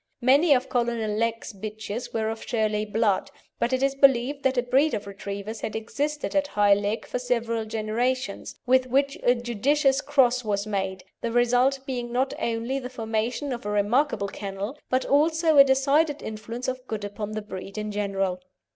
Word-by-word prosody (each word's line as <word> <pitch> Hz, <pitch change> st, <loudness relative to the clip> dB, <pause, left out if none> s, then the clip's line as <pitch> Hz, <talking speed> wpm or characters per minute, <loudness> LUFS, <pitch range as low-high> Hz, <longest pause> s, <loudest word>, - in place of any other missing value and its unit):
Many 280 Hz, +5 st, +5 dB
of 255 Hz, +1 st, -1 dB
Colonel 235 Hz, -3 st, 0 dB
Legh's 230 Hz, +1 st, -2 dB
bitches 215 Hz, +3 st, -6 dB
were 220 Hz, -1 st, -1 dB
of 225 Hz, -, -7 dB
Shirley 215 Hz, -2 st, 0 dB
blood, 210 Hz, -2 st, +1 dB, 0.3 s
but 235 Hz, -, +1 dB
it 260 Hz, +1 st, +1 dB
is 275 Hz, 0 st, +2 dB
believed 275 Hz, 0 st, +3 dB
that 265 Hz, -1 st, +1 dB
a 245 Hz, -, +3 dB
breed 265 Hz, +3 st, +2 dB
of 205 Hz, -, -5 dB
Retrievers 200 Hz, +2 st, -6 dB
had 220 Hz, -, -4 dB
existed 290 Hz, +8 st, -3 dB
at 290 Hz, -1 st, +2 dB
High 205 Hz, -6 st, +4 dB
Legh 205 Hz, +2 st, -1 dB
for -, -, -3 dB
several 230 Hz, -2 st, -1 dB
generations, 225 Hz, +2 st, -2 dB
with 255 Hz, 0 st, +3 dB
which 275 Hz, +2 st, +1 dB
a 245 Hz, -, +4 dB
judicious 265 Hz, +4 st, +1 dB
cross 255 Hz, -4 st, +3 dB
was 205 Hz, -2 st, -1 dB
made, 190 Hz, -3 st, -3 dB, 0.2 s
the 235 Hz, -, -2 dB
result 245 Hz, +3 st, +3 dB
being 245 Hz, -3 st, -4 dB
not 260 Hz, +2 st, 0 dB
only 235 Hz, +4 st, -1 dB
the 250 Hz, -1 st, -6 dB
formation 230 Hz, +3 st, -2 dB
of 240 Hz, -, -6 dB
a 205 Hz, -, -4 dB
remarkable 210 Hz, +2 st, +1 dB
kennel, 200 Hz, +4 st, -5 dB
but 255 Hz, +1 st, +1 dB
also 315 Hz, +1 st, +3 dB
a -, -, +12 dB
decided 280 Hz, +3 st, +2 dB
influence 225 Hz, +3 st, -6 dB
for 255 Hz, 0 st, -1 dB
good 215 Hz, -2 st, -4 dB
upon 205 Hz, +1 st, -5 dB
the 215 Hz, -, -3 dB
breed 195 Hz, 0 st, -8 dB
in 215 Hz, 0 st, -3 dB
general. 195 Hz, -3 st, -1 dB
235 Hz, 180 wpm, -25 LUFS, 215-265 Hz, 0.3 s, a